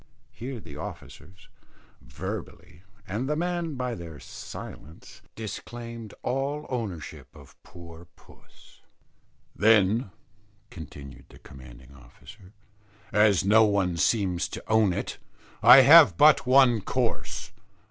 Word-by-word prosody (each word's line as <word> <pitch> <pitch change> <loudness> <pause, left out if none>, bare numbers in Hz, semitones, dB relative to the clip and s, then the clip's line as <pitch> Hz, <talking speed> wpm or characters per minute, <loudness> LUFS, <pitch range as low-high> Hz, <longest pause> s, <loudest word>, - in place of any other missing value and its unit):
Here 125 +1 -8
the 75 -7 -12
officers, 95 +4 -11 0.5
verbally, 65 +3 -9 0.3
and 115 +8 -4
the 150 - 0
men, 170 -1 -3
by 125 -1 -3
their 85 -6 -9
silence, 80 +3 -11
disclaimed 115 0 -8
all 140 +3 -3
ownership 105 - -6
of 70 -3 -16
poor 85 -1 -14
puss. - - -21 0.7
"Then," 105 +1 +3 0.6
continued 70 -4 -11
the - - -16
commanding 65 0 -15
officer, 90 - -17 0.6
"as 105 -2 +3
no 110 +3 +5
one 95 -4 0
seems 90 +1 0
to - - -8
own 110 -3 +3
it, 85 - -5 0.4
I 135 - +9
have 150 +4 +7
but 150 -3 +5
one 130 -4 +4
course. 90 - -3
105 Hz, 110 wpm, -26 LUFS, 85-125 Hz, 0.7 s, I